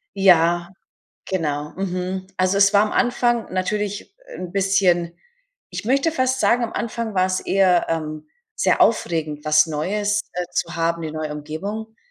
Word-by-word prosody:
Ja, 175 -3 +4 0.6
genau. 150 -5 -2
Mhm. 185 0 -3
Also, 185 +1 +1
es 200 0 +5
war 200 0 +5
am 210 - -1
Anfang 240 -3 +1
natürlich 205 - -3 0.2
'n 180 -1 -6
bisschen 185 -3 +2 0.6
ich - - -6
möchte 275 +7 +2
fast 260 -3 0
sagen, 245 -1 +3
am 230 - -2
Anfang 230 -1 -3
war 185 0 +4
es 185 0 -1
eher, 185 -3 +3
ähm, 155 -2 -4 0.3
sehr - - +1
aufregend, 160 -8 +1
was 155 +1 +4
Neues, 205 +7 -1
äh, 180 - -2
zu 170 -1 -2
haben, 165 0 0
die 160 - -4
neue 155 -1 -4
Umgebung. 200 +10 -6
185 Hz, 155 wpm, -21 LUFS, 165-210 Hz, 0.6 s, es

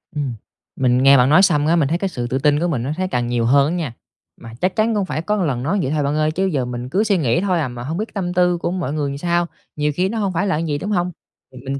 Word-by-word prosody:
Ừm. 140 -4 -2 0.4
Mình 125 -2 +2
nghe 140 0 +7
bạn 125 +1 +4
nói 155 +5 +6
xong 155 -7 +3
á, 165 - +3
mình 160 -5 +2
thấy 165 +4 0
cái 195 +2 -2
sự 125 -8 -4
tự 130 - -1
tin 145 +1 +2
của 175 - 0
mình 135 -9 -1
nó 135 - -2
thấy 185 0 -1
càng 125 -7 -1
nhiều 120 -1 0
hơn 140 +3 +4
á - - -1
nha. 155 -9 -3 0.5
Mà 115 -1 -10
chắc 185 +1 0
chắn 220 +1 +1
cũng 200 -2 0
phải 155 - -3
có 210 +5 -1
lần 145 -11 -1
nói 190 +9 0
vậy 135 - -2
thôi 150 -1 0
bạn 140 +1 0
ơi, 155 0 +1
chứ 190 +5 -1
giờ 145 -9 0
mình 120 0 -5
cứ 195 +10 +1
suy 205 -3 +2
nghĩ 125 -3 +1
thôi 185 -3 +1
à, 150 - 0
mà 120 -1 -7
hông 155 +6 -4
biết 215 +3 -4
tâm 180 -3 -3
tư 180 -1 +2
của 170 - -2
mọi 175 -6 -3
người 150 -2 -1
làm 140 - -5
sao. 175 +2 0 0.3
Nhiều 150 0 0
khi 185 +3 +1
nó 225 - -3
hông 200 -3 -1
phải 185 +4 0
là 180 -6 0
như 165 - -2
vậy, 145 - 0
đúng 200 +8 -4
hông? 180 -2 0 0.5
Mình 135 +1 -3
155 Hz, 320 wpm, -20 LUFS, 135-180 Hz, 0.5 s, nghe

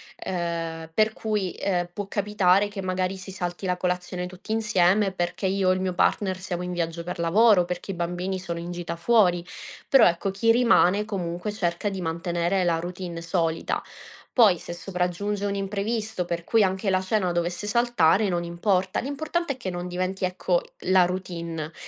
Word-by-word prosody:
Ehm, 165 -2 -4
per 215 +4 +3
cui, 210 -4 -2
ehm, 175 -3 -1
può 205 +2 -5
capitare 205 -1 +2
che 205 -1 -6
magari 185 0 -1
si 190 +1 -9
salti 175 0 -4
la 180 -1 +1
colazione 180 0 -2
tutti 185 +4 -6
insieme 205 -2 +3
perché 175 +1 -3
io 190 0 +1
o - - +6
il 185 - -2
mio 185 -1 -1
partner 190 +1 +1
siamo 180 -1 -4
in 180 - -4
viaggio 170 -1 -3
per 180 0 -6
lavoro, 200 +4 +5
o - - -1
perché 180 +2 -4
i - - -4
bambini 180 +2 -2
sono 170 -2 -5
in 170 +1 -6
gita 175 -1 -4
fuori. 175 -2 +3 0.4
Però, 270 -3 +7
ecco, 175 +3 0
chi 225 +4 +3
rimane, 220 -5 +4
comunque, 185 -2 -3
cerca 185 -1 -1
di 195 -1 -5
mantenere 170 +2 0
la 170 -2 +1
routine 175 0 -6
solita. 165 -1 -1 0.5
Poi, 215 -8 +5
se - - -9
sopraggiunge 180 +3 -2
un 200 0 -1
imprevisto 210 +1 -2
per 170 -1 -4
cui 225 -2 +4
anche 190 +1 0
la 185 -1 +2
cena 190 -2 0
dovesse 175 +4 -2
saltare 210 -4 +3
non 175 -1 -1
importa; 185 +2 0
l'importante 305 +4 -2
è - - -15
che 230 -7 -4
non 175 0 -4
diventi, 185 +2 -3
ecco, 180 -1 +1 0.3
la 185 -1 +7
routine. 170 -3 -4
185 Hz, 180 wpm, -25 LUFS, 175-200 Hz, 0.5 s, Però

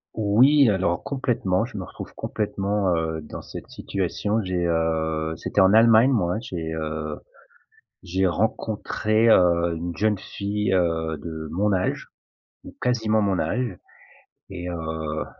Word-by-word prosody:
Oui, 120 +6 +5
alors 95 -3 0
complètement, 115 -7 0
je 105 - -9
me 95 - -4
retrouve - - -9
complètement, 100 -3 -1
heu, 80 -1 -2
dans 75 - -8
cette - - -9
situation. 105 +2 -2
J'ai 90 -2 -1
heu, 80 -1 0
c'était - - 0
en 95 0 +6
Allemagne 115 +3 +6
moi, 105 -6 +1
j'ai, 80 -8 -5
heu, 75 -1 -4 0.9
j'ai 95 +1 0
rencontré, 110 +3 0
heu, 85 -3 +4
une 85 0 -5
jeune 105 -1 +1
fille, 100 +2 -3
heu, 80 -3 0
de 80 0 -6
mon 105 +4 +1
âge, 95 -1 -1 0.6
ou - - -12
quasiment 110 -3 +1
mon 100 -3 +1
âge 120 -6 -1 0.7
et 90 -2 -6
heu, 80 -2 -4
95 Hz, 135 wpm, -24 LUFS, 80-110 Hz, 0.9 s, en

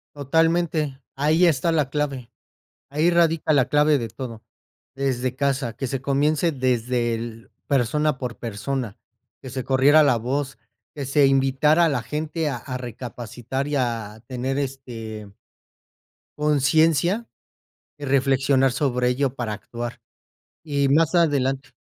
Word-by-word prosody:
Totalmente. 155 -1 +1 0.2
Ahí 155 +5 +3
está 165 +1 +2
la 150 -4 +1
clave. 135 -4 -3 0.6
Ahí 155 +4 +2
radica 165 -2 +2
la 135 -5 +4
clave 150 0 +4
de 115 -2 -4
todo, 115 0 -8 0.5
desde 130 -2 -1
casa 135 -4 -1
que 135 - -4
se 130 0 -3
comience 145 +4 +1
desde 125 -3 0
el, 115 0 -7 0.2
persona 140 +2 +1
por 125 -3 -5
persona 115 +1 -4 0.4
que 130 - -9
se 130 0 -4
corriera 140 +4 +5
la 140 -5 +4
voz, 135 +4 -3 0.3
que 140 -3 -5
se 140 +1 +4
invitara 135 +4 +3
a - - +4
la 145 - -1
gente 155 +1 -3
a 135 - -2
a 130 +1 -6
recapacitar, 125 +2 -5
y 145 - -1
a 115 -3 -3
tener 130 +2 -3
este 115 -6 -6 1.1
conciencia 155 - +2 0.7
y 145 - -7
reflexionar 135 0 +3
sobre 125 -2 0
ello 135 +1 0
para 115 -4 -3
actuar. 120 +2 -7 0.6
Y 140 -3 0
más 160 +4 +3
adelante 135 -6 +1
135 Hz, 135 wpm, -23 LUFS, 125-150 Hz, 1.1 s, corriera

